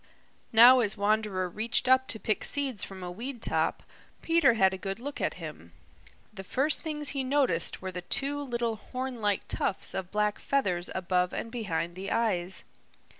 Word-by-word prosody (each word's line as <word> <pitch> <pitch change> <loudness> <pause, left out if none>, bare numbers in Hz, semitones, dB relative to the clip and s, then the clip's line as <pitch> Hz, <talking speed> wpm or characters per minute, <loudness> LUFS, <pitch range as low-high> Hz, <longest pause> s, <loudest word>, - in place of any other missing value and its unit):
Now 240 +3 +8
as 220 -3 +1
Wanderer 205 -2 0
reached 220 +7 0
up 260 0 +4
to 220 - -3
pick 215 +2 -1
seeds 270 -7 0
from 190 -1 -8
a 180 - -5
weed 240 +7 -5
top, - - 0 0.4
Peter 330 -8 +4
had 190 -3 +4
a - - -4
good 195 +2 -4
look 285 +4 -6
at - - -1
him. - - -9 0.6
The 195 -2 -8
first 270 +10 +1
things 300 -2 -1
he 275 -2 -1
noticed 255 -12 0
were 190 - -4
the 180 0 -6
two 280 +10 0
little 235 -4 -2
horn 255 +1 -6
like 205 -2 0
tufts 190 - -1
of 190 -2 -4
black 210 0 0
feathers 185 -11 0
above 180 -1 0
and 230 - -5
behind 175 -8 -3
the 190 +2 -6
eyes. 190 -5 -1
220 Hz, 175 wpm, -29 LUFS, 190-260 Hz, 0.6 s, Now